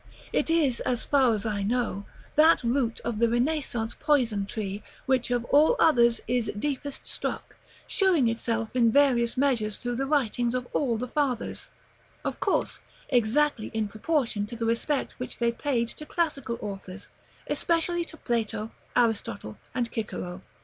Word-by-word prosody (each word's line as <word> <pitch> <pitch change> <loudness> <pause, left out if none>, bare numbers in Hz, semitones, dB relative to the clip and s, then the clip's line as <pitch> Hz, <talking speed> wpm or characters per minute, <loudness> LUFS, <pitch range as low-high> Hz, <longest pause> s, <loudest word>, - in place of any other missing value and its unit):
It - - +1
is, 300 -7 +3
as 245 -2 -1
far 270 -4 +4
as 210 - -4
I 210 -2 -1
know, 205 -2 -1 0.3
that 315 0 +6
root 235 -1 0
of 230 -3 -3
the 235 0 +4
Renaissance 240 -2 0
poison 240 -10 +2
tree, 205 -1 -4 0.2
which, 260 -2 +1
of 245 -1 0
all 300 - +6
others, 235 -7 +4
is 245 -1 +1
deepest 285 +3 -3
struck; - - -4 0.3
showing 370 - +3
itself 230 0 -1
in 235 -2 +4
various 250 -4 +3
measures 240 -6 +1
through 245 -1 -3
the 270 +1 -1
writings 245 -4 +1
of 250 -1 -2
all 245 -6 +1
the 250 +3 -3
Fathers, 265 -3 -1 0.6
of - - -2
course - - 0 0.3
exactly 250 0 +2
in 220 -1 0
proportion 220 -2 -1
to 235 - -7
the 230 0 -2
respect 235 +5 +1
which 250 - -5
they 235 -1 +2
paid 235 -1 0
to 305 - -9
classical 280 -8 -1
authors, 195 -1 -6 0.4
especially 340 +1 +1
to 320 - -11
Plato, 225 -4 -2 0.2
Aristotle, 155 - 0 0.2
and 245 -2 +1
Cicero. 185 -4 -4
240 Hz, 155 wpm, -27 LUFS, 225-280 Hz, 0.6 s, that